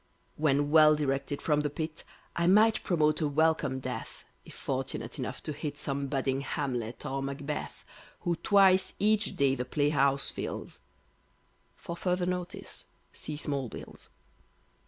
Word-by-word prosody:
When 145 -1 +2
well 155 -1 +7
directed 140 -1 -2
from 150 -2 +2
the 150 0 0
Pit, 155 +2 -5 0.3
I 170 0 +1
might 215 +4 +5
promote 155 -3 +2
a 155 - +2
welcome 150 -2 +2
death, 125 -3 -6 0.2
If - - -13
fortunate - - -3
enough - - -4
to 155 - -4
hit 145 0 -5
Some 140 -1 -2
budding 135 -1 0
Hamlet 125 -5 -3
or 135 -1 -2
Macbeth, 140 +2 -5 0.4
Who 175 -1 0
twice 190 -1 +4
each 215 0 +2
day 140 -1 +3
the 125 - -2
playhouse 140 0 +1
fills, - - -5 1.0
(For 170 - -7
further 180 0 0
Notice 180 -1 -4 0.3
See 150 - -4
Small 140 -4 -2
Bills). - - -10
150 Hz, 140 wpm, -30 LUFS, 140-165 Hz, 1.0 s, well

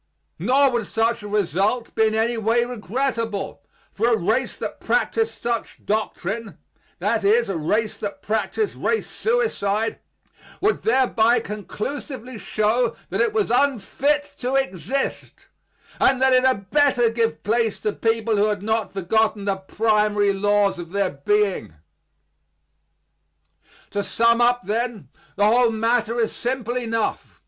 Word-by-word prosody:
Nor 265 - +3
would 235 -4 -1
such 230 +1 0
a 205 - -7
result 205 +3 0
be 220 - +3
in 215 - -1
any 230 +2 +1
way 230 +2 +1
regrettable; 230 - -3 0.3
for 225 +3 0
a 235 -2 +3
race 220 +7 0
that - - -6
practised 450 0 0
such 235 -2 -3
doctrine 215 0 -3 0.4
that - - 0
is, 440 +4 +3
a 195 - -2
race 210 +8 -1
that 205 -1 -6
practised 220 - -1
race 445 - -1
suicide 225 - -1 0.6
would 415 +1 +1
thereby 245 - +3
conclusively 230 +4 -6
show 220 +4 0 0.2
that - - 0
it - - +2
was 425 - 0
unfit 280 +3 +1 0.2
to 255 +2 -1
exist, 270 +1 -2 0.5
and 260 -1 +4
that 265 0 +4
it 255 0 +4
had 200 -8 0
better 265 -6 +3
give 230 0 -1
place 225 0 0
to 210 -1 -1
people 225 -1 0
who 205 +1 +3
had 205 -2 -2
not 220 +1 -1
forgotten 205 +2 0
the 195 -1 0
primary 210 0 +1
laws 205 -1 +2
of 175 +1 -8
their 200 -2 +1
being. 195 - 0 2.2
To 205 - -1
sum 230 +3 +2
up, 245 0 +3
then, 215 - -3 0.3
the 205 - +2
whole 235 +2 +4
matter 230 +1 0
is 225 - 0
simple 245 -1 -2
enough. 230 -2 -2
225 Hz, 140 wpm, -22 LUFS, 205-250 Hz, 2.2 s, and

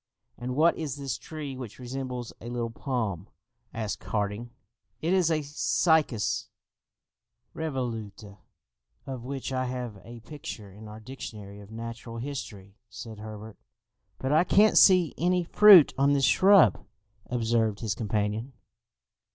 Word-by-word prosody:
"And 125 +1 -5
what 165 +4 +4
is 150 -4 -3
this 140 -4 -4
tree 150 -4 -7
which 125 -5 -8
resembles 125 -1 -6
a 120 - -7
little 120 -1 -3
palm?" 110 - -3 0.4
asked 110 -3 -4
Harding. 105 +2 -2 0.5
"It 170 +3 0
is 185 -3 +3
a 155 -2 0
'cycas 150 - +1 1.1
revoluta,' 115 -9 -5 0.7
of 130 -3 -6
which 135 +1 -5
I 130 0 0
have 125 -5 -5
a 120 0 -11
picture 140 -7 -9
in 105 +3 -12
our 105 +1 -10
dictionary 105 -4 -9
of 100 -1 -13
Natural 115 +1 -7
History!" 110 -6 -7
said 110 +1 -9
Herbert. 110 0 -9 0.6
"But 130 - -3
I 155 +3 +5
can't 210 +4 +4
see 180 -4 +6
any 180 +1 +2
fruit 190 -2 +8
on 140 +1 +4
this 140 -1 +3
shrub!" 185 - +5 0.5
observed 115 -3 0
his 110 -3 -1
companion. 110 +3 -2
120 Hz, 135 wpm, -27 LUFS, 110-145 Hz, 1.1 s, fruit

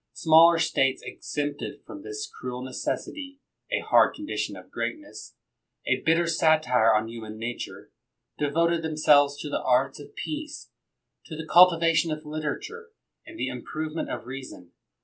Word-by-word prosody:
Smaller 165 +1 +6
States 135 -4 +1
exempted 145 0 -5
from 300 - -9
this 425 +4 -5
cruel 125 0 -7
necessity 275 - -5 0.2
— - - -33
a - - -3
hard - - +4
condition 305 0 -4
of - - -13
greatness, 305 -2 -6 0.5
a - - +1
bitter 165 +2 +2
satire 155 -9 +3
on 110 +1 0
human 110 -2 -8
nature 115 +2 -6 0.2
— - - -57
devoted 165 +3 +1
them 160 -1 -4
selves 145 -2 +5
to - - -5
the 145 - -2
arts 130 +2 +1
of 145 - -13
peace, 305 0 -6 0.5
to 160 - -8
the 160 0 -6
cultivation 165 0 +5
of 155 0 -5
literature, 155 - -5 0.4
and 330 +1 -11
the - - -2
improvement 155 +6 -5
of - - -5
reason. 130 -9 -9
155 Hz, 150 wpm, -26 LUFS, 135-170 Hz, 0.5 s, Smaller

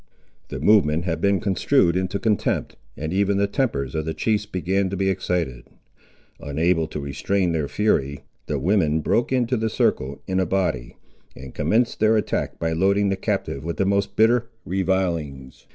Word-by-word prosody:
The - - -5
movement 85 -7 +3
had 80 -2 -2
been 100 -1 +2
construed 95 0 +2
into 95 +2 -1
contempt, 105 +1 -1 0.2
and 80 +3 -4
even 100 +1 +2
the 100 - +3
tempers 100 - -1
of 80 - -1
the 80 - -3
chiefs 105 -2 0
began 95 0 -1
to 100 - -4
be 95 0 +1
excited. 85 -10 -2 0.7
Unable 80 +3 0
to 75 - -6
restrain 90 +6 -1
their 80 -3 -1
fury, 70 -10 0 0.3
the 75 - -1
women 80 0 +1
broke 120 +10 +1
into 125 -1 +1
the 110 0 -1
circle 70 -9 0
in 95 -1 -1
a 95 - +2
body, 85 -11 -1 0.4
and 65 -1 -10
commenced 115 +2 +1
their 110 +1 +4
attack 105 - -2
by 80 0 -1
loading 100 +4 +2
the 95 - +1
captive 70 -6 -3
with 85 +1 -4
the 95 - +1
most 100 0 0
bitter 115 +2 +3 0.2
revilings. 85 -8 -2
95 Hz, 170 wpm, -23 LUFS, 80-100 Hz, 0.7 s, their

